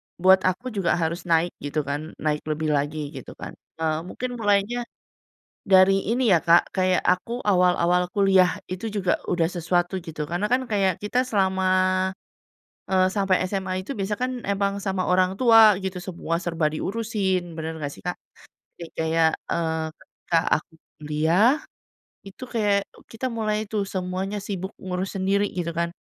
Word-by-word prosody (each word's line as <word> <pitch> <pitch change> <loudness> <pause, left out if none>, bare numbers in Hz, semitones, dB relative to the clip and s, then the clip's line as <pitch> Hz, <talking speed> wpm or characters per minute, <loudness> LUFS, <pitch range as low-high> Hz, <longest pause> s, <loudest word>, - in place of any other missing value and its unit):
buat 190 +2 +5
aku 240 +8 -2
juga 195 -5 +1
harus 170 +1 -2
naik," 165 +1 +2
gitu 145 +1 -2
kan. 145 +3 -5
Naik 150 -1 0
lebih 155 0 -1
lagi 145 0 -1
gitu 130 - -8
kan, - - -8 0.3
eee, 155 -1 0
mungkin 245 +4 -5
mulanya 210 +3 +1 0.8
dari 195 0 +5
ini 235 -5 +3
ya, - - +5
Kak, 170 +1 +4
kayak 185 -1 +2
aku 230 +7 +1
awal-awal 180 -2 +3
kuliah 190 -3 +4
itu 185 +5 -5
juga 200 -3 -1
udah 175 -2 +2
sesuatu 175 +1 -1
gitu, 155 -3 -5
karena 175 +6 -1
kan 255 +1 +1
kayak 195 -5 +1
kita 245 +5 +1
selama, 190 -6 0 1.2
eee, 185 -1 +3
sampai 195 -2 +1
SMA 190 0 -2
itu 190 - -7
biasa 210 -4 -2
kan 255 +3 -2 0.2
emang 200 0 0
sama 190 -2 -2
orang 185 +1 +2
tua 225 -4 +7
gitu, 190 -1 -3
semua 175 -2 -4
serba 165 -3 0
diurusin, 190 -1 -2
bener 160 +1 -4
nggak 145 -2 -4
sih, - - -12
Kak? 180 - -1 0.6
Kek 170 -1 -8
kayak, 160 0 +2 0.2
eee, 160 -1 -1
ketika 165 - -2 0.2
aku 155 - -5 0.3
kuliah 160 - +3 0.7
itu 195 +6 -11
kayak 205 -4 +1
u - - -16
kita 235 +3 -5
mulai 215 -2 -2
tuh 210 -2 -1
semuanya 190 +2 -3
sibuk 190 -1 -5
ngurus 185 0 -3
sendiri 195 +1 +1
gitu 175 -2 -2
kan. 170 0 -1
185 Hz, 160 wpm, -24 LUFS, 170-200 Hz, 1.2 s, tua